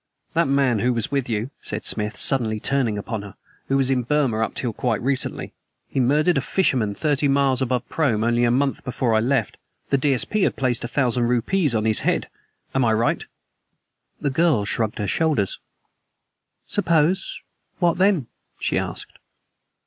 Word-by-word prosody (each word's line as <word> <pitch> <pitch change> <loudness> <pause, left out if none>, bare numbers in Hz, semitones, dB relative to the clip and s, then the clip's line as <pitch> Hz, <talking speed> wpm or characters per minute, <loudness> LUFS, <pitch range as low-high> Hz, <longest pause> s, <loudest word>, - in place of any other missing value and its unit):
"That 170 -1 +2
man 135 -5 +2
who 125 +4 +1
was 115 -1 -1
with 140 -3 -1
you," 115 +4 -2
said - - -2
Smith, 105 -1 0
suddenly 115 -5 +2
turning 125 -4 0
upon 110 +1 -4
her, 100 -2 -11 0.3
"was 135 -1 +2
in 130 -2 +2
Burma 130 -3 0
up - - -4
till 120 -3 -1
quite 115 0 -1
recently. 135 +1 -1 0.4
He - - -2
murdered 150 +5 +3
a - - -3
fisherman 125 - 0
thirty 145 0 +1
miles 135 -2 +2
above 125 -1 -1
Prome 120 -9 0
only 120 +1 +2
a 120 - +3
month 135 +3 0
before 125 -2 -1
I 110 - +4
left. 120 -1 0 0.3
The 140 - +3
D.S.P. 145 - 0
had - - +2
placed 125 -3 0
a - - -2
thousand 125 -2 +1
rupees 125 - +1
on 110 0 0
his 110 -1 +4
head. - - 0 0.4
Am 135 - +2
I 115 -2 +3
right?" 115 +2 +1 1.0
The 140 - -1
girl 145 -7 +2
shrugged 110 0 -1
her 105 - -2
shoulders. 150 -11 0 1.1
"Suppose 170 +3 +1 0.4
What 175 -1 +1
then?" 190 -8 +3 0.3
she - - 0
asked. - - -6
130 Hz, 170 wpm, -22 LUFS, 115-140 Hz, 1.1 s, I